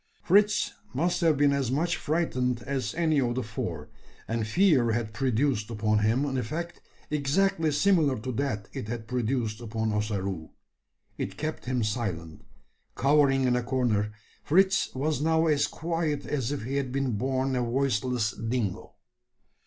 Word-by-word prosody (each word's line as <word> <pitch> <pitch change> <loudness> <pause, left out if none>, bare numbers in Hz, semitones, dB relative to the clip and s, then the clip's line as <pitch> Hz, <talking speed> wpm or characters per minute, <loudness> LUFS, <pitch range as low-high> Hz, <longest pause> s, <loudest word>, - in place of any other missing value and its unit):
Fritz 210 +3 +3 0.2
must 170 +7 +1
have 160 -4 +3
been 145 0 +4
as 140 -3 0
much 165 +7 +1
frightened 125 -7 -1
as 135 -3 -3
any 160 -4 +2
of 120 -1 0
the 130 - -1
four; 85 -8 -5 0.4
and 115 -1 -1
fear 130 - +3
had 110 -1 -2
produced 125 -2 0
upon 110 -1 +1
him 115 +7 +2
an 135 -2 -1
effect 165 +9 -5 0.3
exactly 155 +3 +1
similar 150 -3 +3
to 130 +4 -4
that 125 -5 -2
it - - -5
had 115 0 -5
produced 120 -2 -1
upon 110 -1 -2
Ossaroo. 100 -5 -2 0.7
It 95 0 -4
kept 155 +4 -4
him 125 -2 0
silent. 95 - -3 0.5
Cowering 135 -1 +4
in 125 -1 +3
a 125 - +1
corner, 120 -5 0 0.3
Fritz 190 +4 +3
was 145 +3 -1
now 160 +1 +3
as 150 -2 +3
quiet 165 -2 -2
as 135 -4 -2
if 145 -5 -3
he 135 +4 -2
had 135 -2 -2
been 135 -1 0
born 130 +4 0
a 125 - +1
voiceless 125 -2 0
dingo. 115 -2 -3
130 Hz, 155 wpm, -28 LUFS, 110-150 Hz, 0.7 s, been